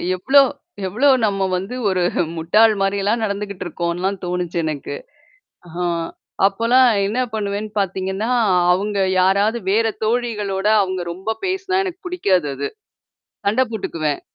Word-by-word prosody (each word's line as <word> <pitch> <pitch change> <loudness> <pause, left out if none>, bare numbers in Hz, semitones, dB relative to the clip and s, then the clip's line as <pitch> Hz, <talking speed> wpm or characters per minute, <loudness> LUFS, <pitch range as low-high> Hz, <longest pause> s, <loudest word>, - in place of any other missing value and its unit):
எவ்ளோ 270 +10 +4 0.5
எவ்ளோ 245 +10 +2 0.2
நம்ம 195 -2 0
வந்து 195 +7 -4
ஒரு 185 -1 0 0.4
முட்டாள் 210 +7 +4
மாரிலாம் 200 +3 0
நடந்துகிட்டு 200 -2 -3
இருக்கோன்லாம் 175 +3 -2
தோணுச்சு 180 -1 -3
எனக்கு. 155 -3 -4 0.7
ஆ - - -13 0.7
அப்போலாம் 230 +6 +3 0.2
என்ன 215 +5 -2 0.2
பண்ணுவேன்னு 210 0 -3
பார்த்தீங்கன்னா, 190 +3 -2 0.4
அவங்க 200 +3 -1 0.2
யாராவது 200 +5 +2
வேற 225 +3 +3 0.2
தோழிகளோட 215 -4 -1 0.2
அவங்க 185 -1 -3
ரொம்ப 190 +5 -4
பேசினா 380 0 0
எனக்கு 370 +1 -7
பிடிக்காது 195 - +1
அது. 140 +1 -3 0.8
சண்டை 220 +6 +3
போட்டுக்குவேன். 155 -8 -2
200 Hz, 115 wpm, -20 LUFS, 185-225 Hz, 0.8 s, எவ்ளோ